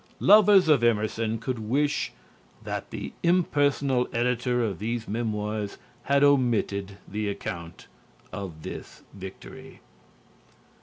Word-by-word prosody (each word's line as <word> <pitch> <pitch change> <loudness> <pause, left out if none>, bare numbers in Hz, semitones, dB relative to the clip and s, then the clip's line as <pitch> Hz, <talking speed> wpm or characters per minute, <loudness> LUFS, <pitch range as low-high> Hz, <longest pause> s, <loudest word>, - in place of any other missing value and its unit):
Lovers 200 -3 +7
of 150 -6 +4
Emerson 110 0 +1
could 125 +1 -4
wish 140 +7 0 0.5
that - - -5
the - - -6
impersonal 145 -7 +2
editor 125 0 0
of 100 -6 -2
these 115 +2 -3
memoirs 105 -2 -3 0.3
had 140 0 +3
omitted 115 -8 +2
the 105 0 -2
account 85 -4 -6 0.5
of 90 -6 -7
this - - -8
victory. 95 -1 -10
115 Hz, 105 wpm, -26 LUFS, 105-140 Hz, 0.5 s, Lovers